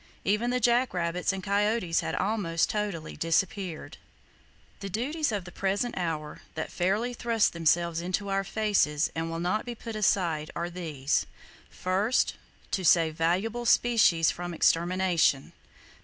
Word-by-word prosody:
Even 210 +4 +1
the 250 +1 +1
jack 240 -2 +2
rabbits 175 +1 0
and 190 -1 -5
coyotes 205 -3 +1
had - - -2
almost 190 -6 0
totally 205 -7 -3
disappeared. 175 +1 -1 0.8
The 195 - -6
duties 280 - -1
of 200 -4 -3
the 175 - -9
present 200 +6 -1
hour, 160 -4 -4
that 160 - -4
fairly 205 +7 0
thrust 235 -2 +1
themselves 170 0 +1
into 185 +3 -2
our 195 0 0
faces 195 -8 +1
and 165 0 -3
will 165 0 -4
not 180 +5 0
be 240 -1 -6
put 230 0 -7
aside, 170 -7 +1
are 170 +1 -3
these: 155 -6 -1 0.4
First,—To 190 0 -1
save 165 -2 +4
valuable 195 +9 0
species 215 -10 +4
from 175 -1 -6
extermination! 170 -4 +2
185 Hz, 140 wpm, -28 LUFS, 165-215 Hz, 0.8 s, save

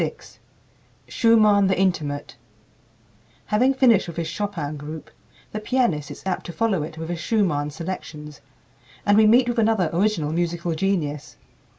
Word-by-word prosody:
VI - - -3 0.9
SCHUMANN, 215 -4 +4
THE 190 -1 +1
"INTIMATE" 150 -9 -1 1.1
Having 255 +6 +2
finished 235 -8 +4
with 170 - -8
his 165 -1 -2
Chopin 160 -5 -4
group, 150 -3 -8 0.4
the 215 - -4
pianist 215 - 0
is - - -10
apt 185 -2 -3
to - - -5
follow 205 -3 0
it 155 +2 -7
with 160 +1 -6
his 175 -1 -3
Schumann 165 -7 0
selections, 150 -2 -7 0.6
and 205 - +4
we 215 0 +6
meet 240 +3 +5
with 240 -1 0
another 215 -6 +2
original 170 -5 0
musical 170 0 -1
genius. 160 -5 -2
180 Hz, 150 wpm, -23 LUFS, 155-215 Hz, 1.1 s, we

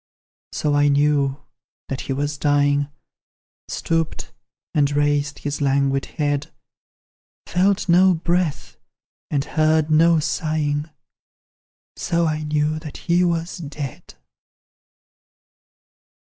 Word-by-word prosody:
So 150 - -1
I 145 0 +4
knew 145 -1 +2 0.4
that 135 - -4
he 135 - -3
was 145 +2 -2
dying 145 -1 +2 0.8
Stooped, 165 -1 -2 0.4
and 145 -2 +3
raised 145 0 0
his 145 0 -4
languid 135 0 +1
head; 145 -2 -1 0.9
Felt 195 +3 +1
no 180 +1 +5
breath, 170 -3 -1 0.5
and 140 -1 0
heard 155 0 +2
no 165 +2 +5
sighing, 150 0 -1 1.1
So 170 0 0
I 155 -1 -1
knew 150 0 0
that 155 -2 -9
he 175 +1 +1
was 170 0 -1
dead. 145 -4 -7
150 Hz, 100 wpm, -22 LUFS, 145-165 Hz, 1.1 s, no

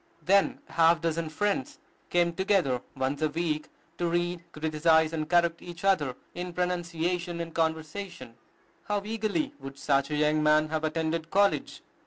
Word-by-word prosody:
Then 195 +4 +3
a - - -17
half 165 0 +5
dozen 165 -1 -1
friends 195 -3 -1 0.3
came 175 -1 +2
together 170 -9 +1 0.2
once 135 +3 -1
a 155 - +2
week 155 -1 -2 0.3
to 175 - +1
read, 175 0 -1
criticise, 160 +1 +2
and 155 -1 -2
correct 170 -1 +3
each 175 0 -9
other 155 -10 +2 0.2
in 180 0 -5
pronunciation 175 -1 -1
and 165 -1 -5
conversation. 160 -2 -3 0.5
How 205 -1 -1
eagerly 225 +7 -1
would 135 0 -9
such 140 -1 +1
a 150 - -1
young 150 +1 +2
man 155 0 +4
have 160 0 -2
attended 160 +1 -1
college! 200 +2 +1
165 Hz, 155 wpm, -28 LUFS, 155-180 Hz, 0.5 s, half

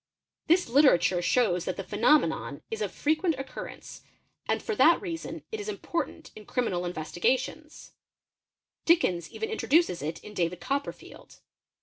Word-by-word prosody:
This 350 +3 +4
literature 235 - +4
shows 180 -3 +2
that 185 - -3
the 195 - -4
phenomenon 235 +11 +1
is 445 0 -3
frequent 315 +2 +1
occurrence 270 0 -8 0.5
and - - +1
for 440 - -2
that 335 -3 +6
reason 335 -4 -6
it 440 - -4
is 415 +1 -5
important 340 -4 -4
in 215 - -12
criminal 225 -9 -1
ve - - -12
pee 155 - -4 0.3
setions 305 +4 -8 0.9
Dickens 185 - +2
even 445 0 -4
introduces 330 - +2
it 155 +3 -3
in 210 - -10
David 175 -2 -1
Copperfield. 280 +1 -5
270 Hz, 140 wpm, -28 LUFS, -, 0.9 s, that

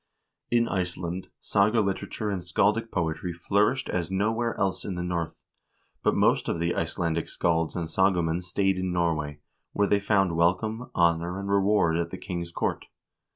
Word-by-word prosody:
In 120 -1 +3
Iceland 90 -1 -3
saga 105 +3 +2
literature 105 +1 -2
and 95 -2 -2
scaldic 105 +6 +1
poetry 85 -1 -2
flourished 105 +9 +1
as 85 -2 -2
nowhere 110 +5 0
else 95 -1 0
in 95 - -4
the 90 - -3
North, 85 -2 -3 0.6
but - - +2
most - - +3
of - - 0
the 85 +1 0
Icelandic 85 0 -1
scalds 80 -2 0
and 85 -2 -1
sagamen 85 -1 +2
stayed 95 +1 0
in 95 0 -1
Norway, 80 -4 -1 0.3
where 105 - +2
they 100 - +3
found 100 -4 +2
welcome, 100 +8 +1
honor, 85 +2 +2
and 100 0 -3
reward 100 -4 +3
at 85 0 -1
the 95 - -6
king's 85 -2 -5
court. - - -2
90 Hz, 160 wpm, -27 LUFS, 85-100 Hz, 0.6 s, In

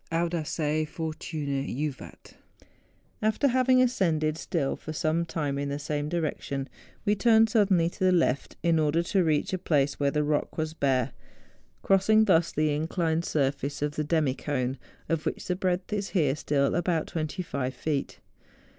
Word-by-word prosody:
Audaces 160 -2 -1
fortuna 155 -3 -3
juvaL 145 +1 -4 1.1
After 220 +6 +2
having 255 0 +4
ascended 165 -11 +1
still 160 -3 -2
for 155 - -7
some 160 +2 0
time 145 -4 -2
in 140 0 -2
the 140 - -2
same 145 0 -3
direction, 145 -4 -2 0.4
we 205 - +3
turned 225 +1 +4
suddenly 195 -7 +3
to 190 - -2
the 185 - +5
left, 165 -6 +1
in 165 -1 +3
order 155 +2 +2
to 190 +2 +1
reach 155 +1 +1
a 185 - -1
place 145 -5 +1
where 140 -1 +2
the 150 +1 0
rock 150 0 -1
was 155 -1 -2
bare, 135 -5 +1 0.7
crossing 215 +3 +4
thus 170 -5 +3
the 155 0 +1
inclined 160 +2 -1
surface 140 0 -1
of 150 0 -2
the 155 - -1
demi 150 -3 +1
cone, 130 -2 -2 0.3
of 165 -2 -1
which - - -3
the 180 - -1
breadth 185 +1 -1
is 200 -1 -2
here 150 -8 +1
still 140 -2 +1
about 170 -1 0
25 155 -5 -3
feet. 140 +2 -3
155 Hz, 160 wpm, -27 LUFS, 145-180 Hz, 1.1 s, the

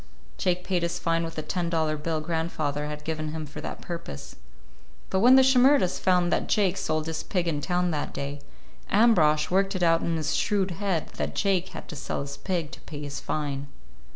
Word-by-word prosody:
Jake 180 0 +1
paid 180 -3 0
his 170 0 -1
fine 165 0 0
with 165 0 -6
a 155 - -2
ten 170 +2 -2
dollar 160 -2 +1
bill 155 +1 -2
grandfather 155 -3 -2
had 150 0 -6
given 155 -1 -3
him 160 -1 -4
for 145 - -8
that - - -6
purpose. 165 - -7 0.8
But 190 - +2
when 245 +6 +7
the 265 - +7
Shimerdas 260 -5 +4
found 180 -2 +3
that - - 0
Jake 195 -3 +2
sold 155 0 -1
his 160 0 -3
pig 180 -3 -1
in 150 -3 -1
town 180 +2 0
that 150 -2 -2
day, 140 +1 -5 0.5
Ambrosch 175 -9 +4
worked 195 +1 +2
it 185 - -1
out 165 -1 +4
in 165 - 0
his 155 0 -1
shrewd 195 -3 +1
head 180 -2 -2
that - - -3
Jake 190 -2 +1
had - - -9
to 160 - -6
sell 140 - -3
his 140 0 -6
pig 170 -5 -2
to - - -10
pay 150 -2 -8
his 145 0 -5
fine. 145 -2 -3
165 Hz, 210 wpm, -27 LUFS, 150-185 Hz, 0.8 s, when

